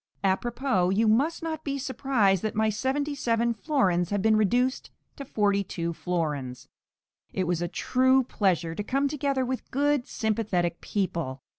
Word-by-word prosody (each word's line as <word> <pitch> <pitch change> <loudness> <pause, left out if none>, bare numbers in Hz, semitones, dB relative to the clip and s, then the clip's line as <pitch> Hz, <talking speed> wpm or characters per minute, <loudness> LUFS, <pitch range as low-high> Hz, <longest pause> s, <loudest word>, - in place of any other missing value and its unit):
A 190 -1 +4
propos, 230 -5 0
you 225 +1 +3
must 280 +11 +2
not 315 -1 -4
be 280 -1 -2
surprised 255 - +1
that 215 - -3
my 220 0 +2
seventy 270 +7 -1
seven 235 -4 +1
florins 195 - +1
have 205 -1 -1
been 220 0 +4
reduced 245 +5 +1 0.3
to 280 - -7
forty 205 -5 +1
two 170 -2 -4
florins. 150 -8 -3 0.7
It 185 - 0
was 175 -1 -1
a 175 - 0
true 260 +7 +2
pleasure 180 -8 0
to 205 - -4
come 275 +6 0
together 275 -2 -1
with 255 0 -4
good 285 -1 +1
sympathetic 200 -6 -1
people. 165 -9 -3
220 Hz, 160 wpm, -27 LUFS, 185-265 Hz, 0.7 s, A